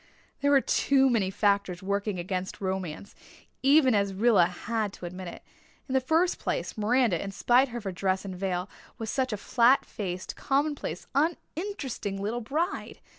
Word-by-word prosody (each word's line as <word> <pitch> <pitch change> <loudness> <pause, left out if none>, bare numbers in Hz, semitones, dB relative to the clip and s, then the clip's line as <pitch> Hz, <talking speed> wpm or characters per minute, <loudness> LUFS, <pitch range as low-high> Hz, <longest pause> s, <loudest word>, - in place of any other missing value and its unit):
There 285 - +3
were 280 -1 +6
too 270 -1 +3
many 205 -6 +2
factors 200 -2 0
working 200 0 -1
against 185 +1 -4
romance, 190 -2 -4
as - - -27 0.4
even 275 -1 +5 0.2
Rilla 205 -5 +5
had 210 +3 -3
to - - -9
admit. 180 0 -7 0.4
In 260 - -4
the 265 - +3
first 325 +7 +2
place, - - -2
Miranda, 225 -3 +2
in 195 - -5
spite 245 +6 +3
of 240 -2 -5
her 195 - -3
dress 190 +1 -1
and 190 -2 -5
veil, 180 0 -2 0.3
was 225 -1 -4
such 260 -2 0
a 210 - -2
flat 240 +5 +3
faced, 185 -3 -5
commonplace, 285 +1 -1
uninteresting 295 - -2
little 220 +5 -2
bride. 310 - -2
215 Hz, 160 wpm, -28 LUFS, 190-265 Hz, 0.4 s, were